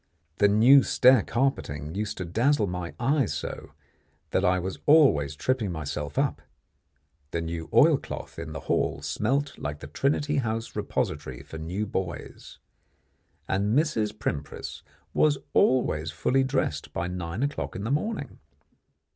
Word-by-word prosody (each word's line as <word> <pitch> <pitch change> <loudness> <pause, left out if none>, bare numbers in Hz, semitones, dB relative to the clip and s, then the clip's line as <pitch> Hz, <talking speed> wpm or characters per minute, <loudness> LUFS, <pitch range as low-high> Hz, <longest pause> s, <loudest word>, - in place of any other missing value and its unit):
The 105 - +6
new 120 +7 +7
stair 130 -2 +5
carpeting 80 - -1
used 105 +1 -3
to 90 - -4
dazzle 115 - +2
my 90 -2 -5
eyes 135 -1 +1
so, - - -6 0.6
that 95 - +1
I 90 -1 +3
was 95 +1 -4
always 135 - +5
tripping 115 - -1
myself 75 -2 -5
up; - - +1 0.9
the 85 - -2
new 80 -1 -4
oil - - +6
cloth - - -8
in - - -6
the - - -6
hall - - -1
smelt 140 +1 -1
like 75 0 -4
the - - -8
Trinity 145 - 0
House 115 -3 -2
repository - - -3
for 80 - -9
new 90 +7 -3
buoys; 90 -6 -5 0.9
and 100 +5 +1
Mrs. 120 -9 +1
Primpris 75 -6 -4 0.3
was 150 -2 +3 0.2
always 80 -12 +2
full 125 - +1
dressed 130 - -1
by 85 - -2
nine 90 +4 -3
o'clock 145 0 -3
in 95 - -4
the 110 - -2
morning. 210 +11 -2
105 Hz, 145 wpm, -27 LUFS, 85-135 Hz, 0.9 s, new